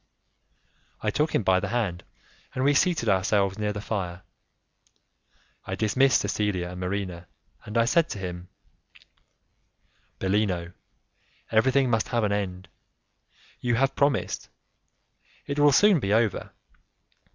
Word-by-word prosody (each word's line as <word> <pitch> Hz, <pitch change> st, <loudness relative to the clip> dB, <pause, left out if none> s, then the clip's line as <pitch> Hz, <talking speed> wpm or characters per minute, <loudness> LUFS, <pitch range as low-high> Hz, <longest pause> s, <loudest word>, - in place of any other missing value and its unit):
I -, -, 0 dB
took 150 Hz, +2 st, 0 dB
him -, -, +1 dB
by 95 Hz, -1 st, +3 dB
the -, -, -3 dB
hand, 100 Hz, -8 st, -2 dB, 0.5 s
and 130 Hz, -, -1 dB
we 145 Hz, +1 st, +4 dB
seated 165 Hz, -5 st, +2 dB
ourselves 100 Hz, 0 st, +1 dB
near 105 Hz, -1 st, 0 dB
the 105 Hz, -, -5 dB
fire. 95 Hz, -4 st, -4 dB, 1.4 s
I -, -, -3 dB
dismissed 130 Hz, +5 st, +3 dB
Cecilia 95 Hz, -4 st, -1 dB
and 90 Hz, -, -8 dB
Marina, 90 Hz, -2 st, -4 dB, 0.4 s
and 105 Hz, +2 st, -4 dB
I 115 Hz, -, +4 dB
said 165 Hz, +6 st, +2 dB
to -, -, -5 dB
him, 90 Hz, -2 st, -6 dB, 1.7 s
"Bellino, 95 Hz, -3 st, -1 dB, 0.8 s
everything 130 Hz, +3 st, +3 dB
must 115 Hz, -2 st, +1 dB
have 120 Hz, -2 st, 0 dB
an 105 Hz, -, +1 dB
end; 95 Hz, -2 st, -3 dB, 0.9 s
you 120 Hz, -1 st, 0 dB
have 135 Hz, +3 st, +1 dB
promised: 140 Hz, -4 st, 0 dB, 1.0 s
it 140 Hz, +1 st, -3 dB
will 145 Hz, 0 st, +6 dB
soon 200 Hz, +5 st, +5 dB
be 100 Hz, -6 st, -2 dB
over. 110 Hz, -2 st, +1 dB
105 Hz, 130 wpm, -26 LUFS, 95-130 Hz, 1.7 s, will